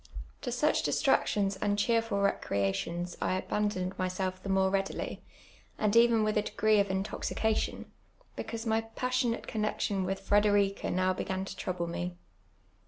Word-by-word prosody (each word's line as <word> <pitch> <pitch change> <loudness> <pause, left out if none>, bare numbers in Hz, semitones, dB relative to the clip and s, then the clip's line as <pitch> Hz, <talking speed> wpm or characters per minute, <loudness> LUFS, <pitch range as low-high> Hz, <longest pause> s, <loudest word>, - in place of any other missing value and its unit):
To 245 - -3
such 295 +6 +2
distractions 200 -1 +2
and 205 +1 0
cheerful 225 -1 +1
recnations 135 - -1
I - - +1
abandoned 185 -1 -2
myself 185 0 -2
the 195 - -6
more 190 0 +3
readily, 195 0 -2 0.6
and 210 0 +1
even 230 -1 +6
with 215 0 +2
a - - +2
de^ee 215 0 +2
of 200 - -1
intoxica 205 +3 0
:ion, - - -9 0.5
because 230 0 -5
my 225 0 +2
passionate 250 +1 -1
connexion 210 -2 -1
with 195 +1 -4
Frederiea 205 -1 +3
now 185 +1 +2
Dc^^.in 190 +1 -3
to - - -7
trouble 180 -2 -3
me. 175 +1 -4
200 Hz, 145 wpm, -30 LUFS, 185-215 Hz, 0.6 s, even